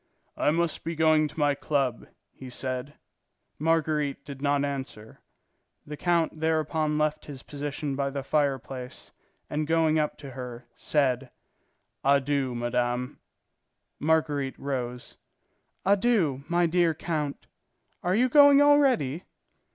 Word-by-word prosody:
"I - - +1
must 165 +1 0
be 165 +1 -3
going 155 -1 +4
to 150 - -15
my 145 -1 +3
club," 140 -4 -1 0.2
he 130 - -11
said. 130 +3 -4 0.6
Marguerite 155 -3 0
did 140 -2 -9
not 145 0 +1
answer. 130 -6 -6 0.6
The 150 - -6
count 170 -1 0
thereupon 155 -1 0
left 155 0 0
his 140 -3 -9
position 145 0 -4
by 140 0 -1
the 140 0 -4
fireplace 135 -3 -2 0.4
and 150 0 -2
going 160 -1 +3
up 150 - -1
to 140 -2 -9
her, 125 -2 -8
said: 135 -3 0 0.7
"Adieu, 140 -2 +2
madame." 120 +1 -1 0.8
Marguerite 150 -3 0
rose. 125 -3 -5 0.7
"Adieu, 195 - +2
my 175 +1 +2
dear 170 -1 +2
count. 155 -3 -3 0.6
Are 180 +1 +1
you 250 +4 +4
going 285 +1 +7
already?" 265 - +3
145 Hz, 120 wpm, -27 LUFS, 135-160 Hz, 0.8 s, going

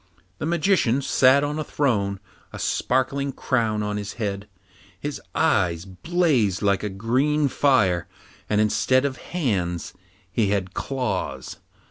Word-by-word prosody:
The 155 - -2
Magician 165 - +2
sat 135 +2 +4
on 150 +1 -2
a - - -1
throne, 100 -11 0 0.3
a - - -8
sparkling 135 +2 0
crown 115 -5 0
on 105 0 -2
his 105 0 -5
head; 100 -2 -4 0.5
his 145 0 -5
eyes 90 - +2
blazed 120 - +1
like 100 -1 +2
a 105 - -2
green 130 +9 +1
fire, 105 -12 +2 0.4
and 105 - +2
instead 130 +5 +2
of 135 -2 -2
hands 100 - -2 0.4
he 110 0 +1
had 95 -2 -1
claws. 130 -2 -3
120 Hz, 130 wpm, -24 LUFS, 100-140 Hz, 0.5 s, sat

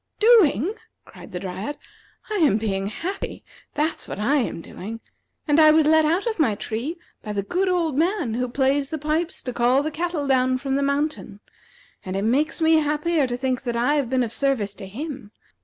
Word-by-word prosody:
"Doing!" 405 - +5 0.3
cried - - -13
the 180 - -4
Dryad; 195 +9 -5 0.5
"I 425 - 0
am 300 - +4
being 195 -3 -2
happy; 355 - -5 0.3
that's 305 +2 -1
what - - -6
I 275 +8 +2
am 245 -10 -1
doing. 215 +6 -8 0.5
And 295 +1 +4
I 310 -1 +8
was 310 0 +5
let 315 0 +5
out 340 +7 +1
of 450 -5 -2
my 235 -9 +3
tree 240 - -4 0.2
by 210 - -5
the 200 -1 -1
good 370 - 0
old 335 -5 0
man 335 - 0
who 250 +2 -1
plays 275 +2 +1
the 315 - -3
pipes 310 +4 -2
to 250 - -4
call 245 +4 +3
the 310 - -2
cattle 330 -1 -2
down 255 -1 +2
from 270 +1 -3
the 280 - +1
mountain. 280 -6 -2 0.6
And 185 0 -5
it 195 - -1
makes 290 +8 +1
me 320 0 +5
happier 300 0 +1
to 245 0 -3
think 255 -1 -1
that 240 -3 -3
I 245 +5 +2
have 285 -5 0
been 260 -1 +2
of 230 - -3
service 240 -7 0
to 195 -2 -9
him. 260 0 -7
275 Hz, 205 wpm, -23 LUFS, 235-315 Hz, 0.6 s, I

